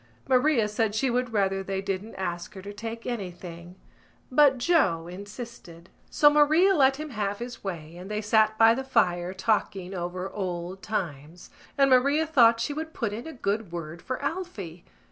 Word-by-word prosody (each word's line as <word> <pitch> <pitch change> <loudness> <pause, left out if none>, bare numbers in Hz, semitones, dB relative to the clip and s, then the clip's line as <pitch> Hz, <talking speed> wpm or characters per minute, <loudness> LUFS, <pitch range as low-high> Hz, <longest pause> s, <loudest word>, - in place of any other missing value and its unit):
Maria 255 -3 +3
said 210 0 -1
she 255 +3 +1
would 250 0 -1
rather 195 -2 +1
they 195 0 -3
didn't 195 +2 -4
ask 175 +1 -4
her 190 - -8
to 205 +1 -7
take 230 +2 -7
anything: 180 -6 -6 0.6
but 275 0 +5
Joe 240 - +2
insisted. 195 -2 -10 0.2
So 295 - +4
Maria 305 +6 +5
let 270 -5 +4
him 305 +1 -7
have 205 -3 -2
his 240 +1 -8
way 170 -4 -6
and 185 +2 -9
they 210 0 -2
sat 215 0 +3
by 225 0 +7
the 265 +3 -3
fire 180 -9 +1
talking 190 -1 -1
over 180 +1 -4
old 185 -1 -4
times 170 -5 -5 0.3
and 275 -1 +4
Maria 280 +5 +4
thought 235 -7 +5
she 235 +6 -1
would 320 +2 -6
put 225 -4 -2
in 235 +7 -6
a - - -6
good 210 -5 -2
word 165 -1 -6
for 255 - -4
Alphy. 250 - -5
210 Hz, 175 wpm, -27 LUFS, 180-255 Hz, 0.6 s, by